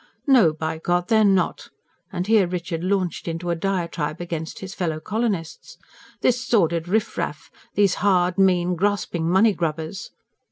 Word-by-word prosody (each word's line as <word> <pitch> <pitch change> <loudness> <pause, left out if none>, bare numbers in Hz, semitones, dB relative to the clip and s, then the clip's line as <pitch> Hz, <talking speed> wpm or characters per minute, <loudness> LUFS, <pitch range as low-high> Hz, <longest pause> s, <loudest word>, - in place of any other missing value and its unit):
"No, 245 - +5
by 160 +1 -4
God, 175 +1 0
they're 220 -1 +4
not!" 195 -4 +1 0.4
And 180 -1 -3
here 210 -3 +4
Richard 170 -1 -4
launched 185 -2 -1
out - - 0
into 175 +1 -3
a - - 0
diatribe 170 -4 -2
against 165 -2 -5
his 190 0 -7
fellow 165 -5 -2
colonists: 200 -2 -3 0.4
"This 250 0 +2
sordid 170 -8 +1
riff 215 +4 -1
raff! - - -4 0.2
These 200 -3 +3
hard, 180 -2 +2
mean, 180 -2 +3
grasping 180 -3 -1
money 200 +4 +4
grubbers!" 165 +3 -4
180 Hz, 155 wpm, -23 LUFS, 165-200 Hz, 0.4 s, No